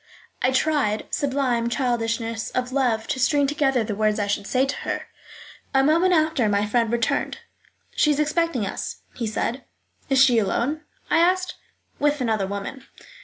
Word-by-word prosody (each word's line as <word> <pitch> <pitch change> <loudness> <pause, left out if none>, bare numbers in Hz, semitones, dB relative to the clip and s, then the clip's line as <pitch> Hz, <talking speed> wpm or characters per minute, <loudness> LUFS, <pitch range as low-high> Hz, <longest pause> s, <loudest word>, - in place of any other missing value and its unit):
I 255 - +3
tried 260 -6 +1
(sublime 260 -4 0
childishness 230 -2 -1
of 250 0 -2
love!) 240 -5 +1
to 260 - -3
string 280 +3 +3
together 270 -4 +1
the 215 -1 -3
words 215 +1 +1
I 205 - 0
should 200 0 -2
say 260 +1 +2
to 275 - -3
her. - - -3 0.7
A 270 - +5
moment 335 +6 +3
after 310 -9 +2
my 205 0 +1
friend 230 +1 +1
returned. 235 -1 0 0.6
"She 300 - +3
is 295 -1 +2
expecting 305 -6 +1
us," 195 - -5
he 230 - -3
said. 235 +4 -2 0.5
"Is 270 -1 +3
she 255 -4 +6
alone?" 245 +9 -1 0.3
I - - +4
asked. 365 +2 +2 0.5
"With 295 0 +2
another 220 -6 0
woman." 200 +7 -6
255 Hz, 165 wpm, -23 LUFS, 225-290 Hz, 0.7 s, she